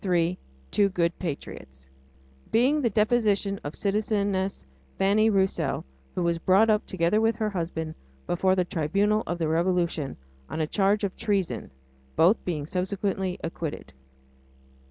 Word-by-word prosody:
III 175 -2 +2 0.4
TWO 200 -1 +3
GOOD 170 -3 0
PATRIOTS 65 - -6 0.6
Being 265 +6 +3
the 240 - +2
deposition 210 -2 +2
of 145 - -5
citizeness 200 - 0 0.3
Fanny 210 +3 +4
Roussell, 195 -2 0 0.3
who 180 - 0
was 170 -1 +1
brought 195 +6 +4
up, 210 0 +1
together 185 +3 +1
with 225 0 +2
her 215 -1 -1
husband, 165 -3 -3 0.3
before 185 +2 +2
the 180 -1 +1
Tribunal 200 +7 +1
of 175 - -2
the 165 -2 0
Revolution 170 -3 0 0.3
on - - -4
a 155 - +2
charge 200 +5 +1
of 195 -2 -1
treason 190 - -1 0.5
both 180 +7 +4
being 155 -5 -2
subsequently 190 +1 -2
acquitted. 160 - -5
190 Hz, 135 wpm, -26 LUFS, 170-205 Hz, 0.6 s, Fanny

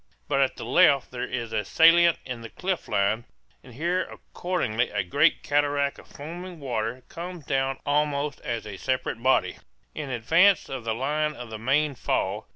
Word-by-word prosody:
But 135 - +2
at 135 - +1
the - - -7
left 135 +2 +4
there 125 -1 -4
is 115 -3 -4
a 105 -1 0
salient 165 +7 +5
in 125 -3 -6
the 115 - -8
cliff 185 +5 -3
line, 105 +4 +1 0.4
and 125 -3 -14
here 175 +6 0
accordingly 170 -10 -2
a 100 -2 -1
great 90 - +2
cataract 145 -1 +1
of - - -15
foaming 175 +4 -8
water 120 -2 -3
comes 175 -2 -8
down 135 -1 0
almost 145 0 0
as 115 -2 -3
a 105 -2 -7
separate 130 -2 -2
body, 130 +2 +2 0.4
in 150 -3 -5
advance 165 - +3
of 130 -4 -6
the 110 -1 -1
line 150 +4 -1
of 120 -2 -9
the 110 - -6
main 140 +5 +1
fall. 105 -3 -2
135 Hz, 175 wpm, -26 LUFS, 115-155 Hz, 0.4 s, salient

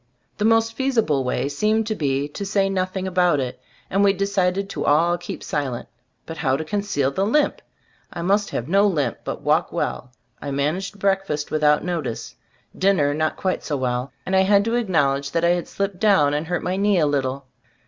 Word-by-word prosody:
The 210 - +1
most 225 0 +3
feasible 225 - +1
way 125 +1 -1
seemed 215 +10 +1
to 215 - -1
be 140 -6 -1
to 200 - -6
say 195 -1 +1
nothing 185 0 -2
about 180 -5 +2
it, 125 -2 -4 0.3
and 195 +2 +1
we 200 -1 +5
de 195 +1 -1
cided 195 0 0
to - - -3
all 165 +4 +3
keep 175 0 -7
silent; 135 -5 -3 0.4
but 165 - -7
how 135 -4 +1
to 160 - -5
conceal 200 -7 -1
the 190 - -1
limp? 290 +9 +1 0.5
I 170 - -5
must 200 +3 +2
have 120 - -3
no 200 +4 +4
limp, 145 - -1
but - - -5
walk - - +2
well. 125 - -3 0.3
I 145 - -5
managed 155 +9 -2
breakfast 195 -7 -1
without 150 -1 +3
notice. 165 -10 -4 0.4
Dinner 185 -7 +2
not 155 +1 -1
quite 185 -1 -2
so 145 - -2
well, 125 0 -2
and 190 - 0
I - - +5
had 200 +1 +4
to 230 - -1
acknowl 170 - +2
edge 140 0 -6
that 165 0 +1
I - - +4
had 175 0 0
slipped 200 -2 -3
down 190 -10 +4
and 150 +2 -2
hurt 175 0 -2
my 185 +1 -1
knee 200 0 +2
a 160 - +3
little. 140 -2 -1
175 Hz, 205 wpm, -22 LUFS, 145-200 Hz, 0.5 s, we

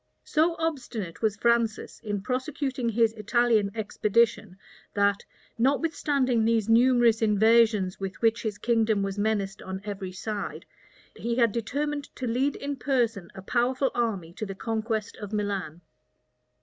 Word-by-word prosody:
So 330 +2 +2
obstinate 245 - -4
was 215 -3 +1
Francis 235 -1 +1
in 205 -2 -3
prosecuting 260 -1 -2
his 225 0 +2
Italian 225 -1 +2
expedition, 215 -2 +1 0.4
that, 200 0 +2 0.4
notwithstanding 275 -3 +1
these 225 -1 +2
numerous 235 -1 +4
invasions 220 -2 +3
with 195 0 -5
which 230 0 +2
his 215 -2 -3
kingdom 220 -2 +1
was 195 +1 -3
menaced 205 -2 -1
on 190 0 -5
every 195 -2 -5
side, 200 +2 -5 0.5
he 235 0 -2
had 235 -3 +3
determined 285 +6 -2
to 260 - -4
lead 255 +4 0
in 285 0 -4
person 235 -9 0
a 190 - -9
powerful 255 +5 +1
army 200 -9 -2
to 215 - -5
the 195 - -6
conquest 220 0 -3
of 205 -1 -7
Milan. 200 -6 -3
225 Hz, 135 wpm, -27 LUFS, 205-245 Hz, 0.5 s, numerous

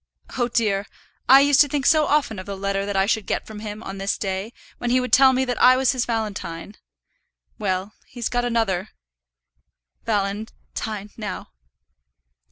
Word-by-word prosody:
Oh, 245 -2 +1
dear, 215 -4 0 0.4
I 270 +1 +9
used 285 0 +5
to 290 - +5
think 280 -1 -2
so 310 -1 +4
often 280 -9 +1
of 185 - -9
the 200 -1 -5
letter 200 0 -2
that 205 - -3
I 195 - +3
should 220 0 0
get - - -2
from 215 -1 -9
him 210 0 -7
on 195 0 -7
this 195 +1 -1
day, 195 +2 -3 0.3
when 245 - -2
he 250 +1 +3
would 250 0 -4
tell 265 0 +7
me 260 0 +1
that 245 -1 -3
I 255 0 +7
was 265 0 +3
his 255 -3 -2
valentine. 205 -5 -4 0.8
Well; 195 0 -2
he's 240 -3 -4
got 245 0 -1
another 220 -5 0 1.2
valen 205 0 -1 0.2
tine 210 -2 -5
now." 210 -4 -6
220 Hz, 175 wpm, -23 LUFS, 200-250 Hz, 1.2 s, I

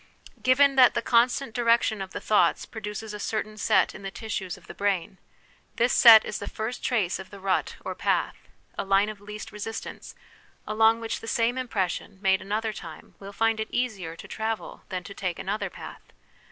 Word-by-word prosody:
Given, 275 +2 +4
that 250 -2 +7
the - - 0
constant 240 +1 +2
direction 230 -2 +2
of 190 - -5
the - - -6
thoughts 210 - +2
produces 215 0 -6
a 210 - -6
certain 215 0 -3
set 210 -2 +2
in - - -10
the 195 - -5
tissues 195 -3 -5
of - - -18
the - - -9
brain, 190 -2 -1 0.6
this 240 +2 +2
set 225 -3 +9
is - - -4
the - - -6
first 220 +3 -5
trace 205 -8 0
of 190 - -9
the 200 - -11
rut 190 -1 0
or - - -3
path, - - -1 0.3
a - - 0
line 195 +1 +3
of 210 -2 -9
least 210 +2 -8
resistance, 215 +1 -7 0.5
along 225 +1 +3
which 225 - -3
the 225 - -10
same 235 0 +1
impression, 200 -6 -3
made 190 -1 +2
another 215 +3 -2
time, 165 -5 -10
will 200 0 -9
find 225 +1 +1
it 220 - -3
easier 205 -10 -2
to - - -11
travel 220 0 -4
than 185 -2 -4
to 200 - -9
take 185 -3 -3
another 200 0 -3
path. - - -10
215 Hz, 195 wpm, -26 LUFS, 195-225 Hz, 0.6 s, set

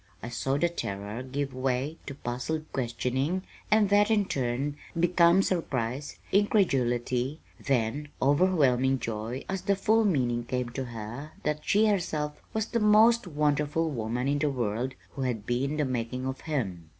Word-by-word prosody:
I 115 - -4
saw 135 +3 -1
the 170 - +3
terror 105 -7 -4
give 135 +1 -3
way 130 +4 -1
to 140 - -5
puzzled 135 +5 -3
questioning, 130 +7 -1 0.3
and 210 -2 +4
that, 205 +1 +5
in 210 -2 +3
turn, 135 -1 -1 0.2
become 175 +2 +5
surprise, 140 -7 -2
incredulity, 135 - +2 0.2
then 135 +2 0
overwhelming 135 -4 +3
joy 115 +1 -4
as 190 -1 -2
the 200 +2 +1
full 220 +3 +3
meaning 125 - +1
came 125 0 -2
to 130 +2 -4
her 120 +6 -7
that 150 0 0
she 210 +7 +3
herself 155 -8 -1
was 220 -1 -1
that 235 - -1
most 220 +1 +5
wonderful 150 +1 +1
woman 120 0 -2
in 145 +1 +1
the 150 0 +2
world 125 0 -2 0.2
who 140 - -6
had 120 -5 -2
been 135 +5 -1
the 150 - +1
making 125 0 -3
of 130 0 -4
him. 95 - -3
140 Hz, 155 wpm, -28 LUFS, 125-170 Hz, 0.3 s, that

